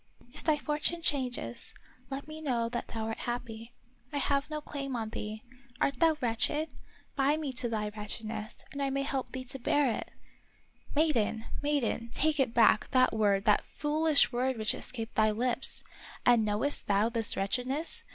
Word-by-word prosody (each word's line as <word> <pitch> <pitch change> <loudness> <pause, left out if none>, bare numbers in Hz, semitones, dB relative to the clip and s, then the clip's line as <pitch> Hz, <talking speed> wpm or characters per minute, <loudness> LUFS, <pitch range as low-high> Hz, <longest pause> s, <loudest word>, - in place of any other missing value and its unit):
" 245 - -24
If - - -3
thy 310 -2 +3
fortune 300 +3 -1
changes, 250 - -1 0.3
let 275 +2 -5
me 310 0 -8
know 240 -6 0
that 240 0 -3
thou 225 -1 -4
art 225 0 -4
happy. 235 -1 -5 0.4
I 290 - -2
have 280 +1 +1
no 305 -1 -3
claim 275 -3 -5
on 225 -2 -2
thee. 215 0 -5 0.4
Art 275 -3 +1
thou 325 -2 +4
wretched.^ 295 +6 0 0.5
bind 285 +3 +2
me 290 -4 -3
to 240 -1 +2
thy 210 -2 -1
wretchedness, 215 +1 -6
that 280 - -5
I 275 - +1
may 275 +1 0
help 275 -2 -2
thee 260 0 -5
to 270 +2 -5
bear 280 +1 +2
it." - - -5 0.4
" - - -19
Maiden! 235 -8 +2 0.2
maiden! 280 -5 0
take 305 0 +2
it 265 -3 +3
back, 225 -2 +4
that 255 -1 +4
word, 205 -2 +2
that 210 - +4
foolish 305 0 +3
word 255 +1 0
which 215 -1 +1
escaped 230 -3 -5
thy 215 0 +4
lips. 240 +4 +1 0.4
And 240 -2 +6
knowest 215 +8 +1
thou 205 +2 +3
this 230 -2 0
wretchedness 255 +10 0
250 Hz, 180 wpm, -31 LUFS, 225-285 Hz, 0.5 s, And